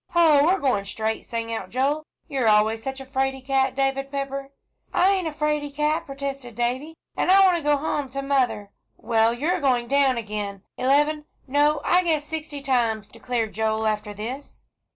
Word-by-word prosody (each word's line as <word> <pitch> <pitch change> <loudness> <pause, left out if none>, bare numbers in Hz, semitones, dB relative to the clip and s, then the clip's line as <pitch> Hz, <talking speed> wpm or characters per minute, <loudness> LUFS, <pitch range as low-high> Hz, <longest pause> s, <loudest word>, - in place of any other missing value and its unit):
"Hoh, 315 -4 +5
we're 365 +4 +3
going 255 -9 +1
straight!" 220 +2 -3
sang 230 -1 -4
out 190 -4 -5
Joel, 285 +5 0 0.2
"you're 260 -4 0
always 215 +1 +3
such 265 +2 -5
a 270 - -8
'fraid 265 0 -2
cat, 265 -1 +1
David 275 0 0
Pepper." 275 0 -4 0.4
"I 380 +2 +4
ain't 375 -4 0
a - - -2
'fraid 300 -1 -2
cat," 300 +1 0
protested 275 -3 -6
Davie, 260 +7 -2 0.2
"and - - 0
I 390 +1 +7
want 365 -2 +5
to - - -4
go 295 -1 +2
home 290 -1 -2
to 275 +1 -4
mother." 245 -7 0 0.3
"Well, 225 -1 +2
you 245 +6 -3
are 360 - -1
going 250 -4 +1
down 275 -2 +3
again, 205 -3 -4
eleven, 295 +3 +2 0.2
no, 290 +2 +2
I 360 - +4
guess 310 -4 0
sixty 300 -2 -5
times," 230 -6 0
declared 230 -1 -3
Joel, 220 0 0
"after 210 -1 -1
this. 235 +7 -7
270 Hz, 185 wpm, -24 LUFS, 230-295 Hz, 0.4 s, I